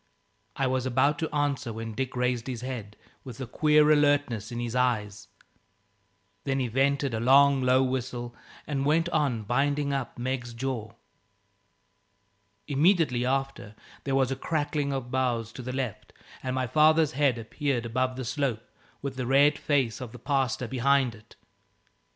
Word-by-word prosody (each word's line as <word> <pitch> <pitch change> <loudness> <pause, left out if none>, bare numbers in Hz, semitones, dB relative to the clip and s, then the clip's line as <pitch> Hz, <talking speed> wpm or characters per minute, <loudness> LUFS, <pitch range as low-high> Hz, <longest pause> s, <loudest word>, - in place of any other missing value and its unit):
I 135 - 0
was 130 0 0
about 130 +4 +2
to 160 - -2
answer 145 -5 -1
when 115 0 -6
Dick 130 +3 -3
raised 125 -1 -1
his 125 -3 -4
head, 120 -5 -6 0.3
with 125 -2 -9
a 130 - -4
queer 150 +4 +4
alertness 145 -8 +2
in 120 - -4
his 120 0 -3
eyes. 110 -5 0 1.2
Then 135 -1 -1
he 130 - 0
vented 135 +2 +1
a 110 - -1
long, 135 +3 +5
low 130 +1 +4
whistle, 125 -2 -3 0.3
and 140 -2 -2
went 160 +4 +2
on 145 -9 0
binding 140 +5 0
up 135 -2 -3
Meg's 120 -1 -3
jaw. 115 -4 -4 1.7
Immediately 145 -5 +2
after, 135 -5 -2 0.3
there 135 -1 -1
was 135 -1 +2
a - - 0
crackling 145 0 -1
of 130 -3 -4
boughs 120 -4 -1
to 130 - -8
the 125 +1 -5
left 130 -5 -5 0.3
and 130 0 -3
my 130 -1 0
father's 155 +3 +4
head 140 -5 +2
appeared 120 +2 -2
above 130 +2 -1
the 130 -1 -5
slope, 130 -4 -2 0.4
with 135 -2 -4
the 125 -2 -3
red 140 +3 +5
face 135 -7 0
of 120 -3 -7
the - - -9
pastor 130 -2 -1
behind 130 0 +2
it. 110 0 -17
130 Hz, 160 wpm, -27 LUFS, 120-140 Hz, 1.7 s, long